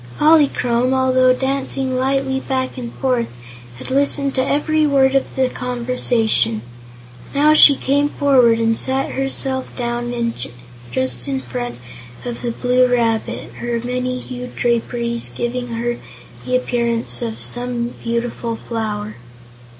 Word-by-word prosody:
Polychrome, 265 -5 +3
although 255 -1 +4
dancing 265 0 -1
lightly 265 +1 0
back 260 -1 -2
and 240 -3 -6
forth, 250 -3 0 0.5
had 130 - -8
listened 280 0 +3
to 260 - +1
every 300 +3 +1
word 270 -2 +3
of 270 - 0
the 265 -1 +3
conversation. 235 - +1 0.7
Now 300 +2 +5
she 295 -2 +9
came 285 +2 +1
forward 255 -6 +4
and 225 0 +1
sat 265 +3 -1
herself 270 -1 0
down 240 -1 -2 0.6
just 125 -1 -1
in 135 -1 -1
front 120 -1 -5 0.5
of 240 -1 -5
the 240 - -2
Blue 250 +2 +2
Rabbit, 235 -1 -1
her 240 -1 -2
many 250 +1 -2
hued 250 0 -8
draperies 235 0 -1
giving 245 +1 -3
her 240 +1 -3 0.5
the 255 - +1
appearance 235 -2 0
of 230 -2 -4
some 245 -1 -1
beautiful 235 0 -3
flower. 215 -2 -4
245 Hz, 125 wpm, -19 LUFS, 235-265 Hz, 0.7 s, she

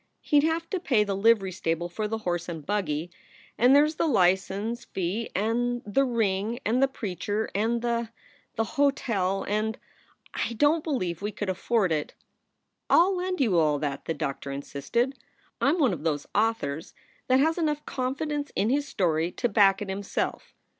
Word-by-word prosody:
He 295 - +4
d 300 - +3
have 330 +1 -1
to 380 - 0
pay 245 -11 +2
the 200 -1 -2
livery 200 -2 +3
stable 170 -1 -2
for 210 +5 -3
the 225 +1 -2
horse 175 -5 -3
and 160 -4 -6
buggy, 175 -5 -2 0.4
and 250 +3 +5
there 290 +1 +7
s 305 - -2
the 325 - 0
license 200 - +1
fee, 190 +5 -3
and 240 +5 0
the 210 +7 +2
ring, 225 -2 0
and 240 +4 +2
the 270 - +5
preacher, 205 -3 -3
and 230 +4 0
the 235 -1 -1 0.5
the 225 - +1
hotel, 230 -10 +1
and 215 +1 -1
Oh, - - -31 0.2
I - - -5
don 295 +7 +3
t - - -28
believe 185 - -2
we 205 +1 -2
could 205 -1 -2
afford 195 0 +1
it." 150 -2 -2 0.7
"I - - +5
ll 375 +3 +5
lend 365 0 -2
you 200 -10 +3
all 150 -2 +3
that," 140 -2 -3
the 165 - -2
doctor 140 -2 -4
insisted. 140 - -2 0.4
"I - - +4
m 325 - +2
one 270 - +3
of 155 - -5
those 150 -2 -1
authors 200 -9 -1 0.3
that 255 0 +4
has 320 +5 +2
enough 300 -2 -1
confidence 285 +3 -3
in 215 +4 +1
his 285 +1 +1
story 170 - 0
to 245 - 0
back 200 -1 +4
it 195 - -8
himself. 195 +1 -3
215 Hz, 190 wpm, -27 LUFS, 180-260 Hz, 0.7 s, there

